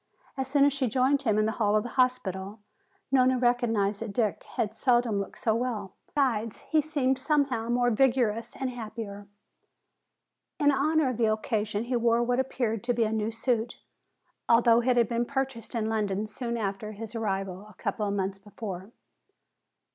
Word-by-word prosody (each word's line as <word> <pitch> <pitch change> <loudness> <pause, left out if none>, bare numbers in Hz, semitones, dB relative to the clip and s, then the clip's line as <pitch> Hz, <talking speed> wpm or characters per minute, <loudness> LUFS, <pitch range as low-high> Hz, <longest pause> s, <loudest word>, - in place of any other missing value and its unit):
As 265 -1 -2
soon 280 +1 +4
as 285 - +3
she 275 -2 0
joined 260 +4 +2
him 220 -6 +1
in 215 - +3
the 220 - +1
hall 210 -2 +1
of 215 - +2
the 245 - -5
hospital, 220 -6 0 0.5
Nona 255 -1 +4
recognized 230 -5 +1
that 225 -3 -4
Dick 215 -2 0
had 215 0 -1
seldom 240 -5 +2
looked 200 - -5
so 220 - +1
well. 225 -5 -2
Besides, 230 -6 0
he 315 -1 +5
seemed 275 -4 0
somehow 270 -5 +1
more 245 0 +2
vigorous 235 -2 +1
and 265 -2 -3
happier. 215 -4 -7 1.3
In 290 -2 +4
honor 295 +1 +2
of 240 - -5
the 225 -2 +3
occasion 215 -1 -1
he 245 +1 -2
wore 235 0 +3
what 245 +1 +1
appeared 235 -4 -1
to 245 -1 +1
be 235 - +2
a 215 - 0
new 220 0 0
suit, 230 0 -1 0.7
although 230 0 +5
it 245 0 +2
had 235 -2 +4
been 235 +1 0
purchased 265 -3 -3
in 220 -2 0
London 210 -2 -1
soon 235 +2 -4
after 210 0 -3
his 220 +1 -8
arrival 195 -4 -2 0.2
a - - -18
number 215 - -1
of 200 - -1
months 195 0 -2
before. 195 -2 -7
230 Hz, 175 wpm, -28 LUFS, 215-255 Hz, 1.3 s, he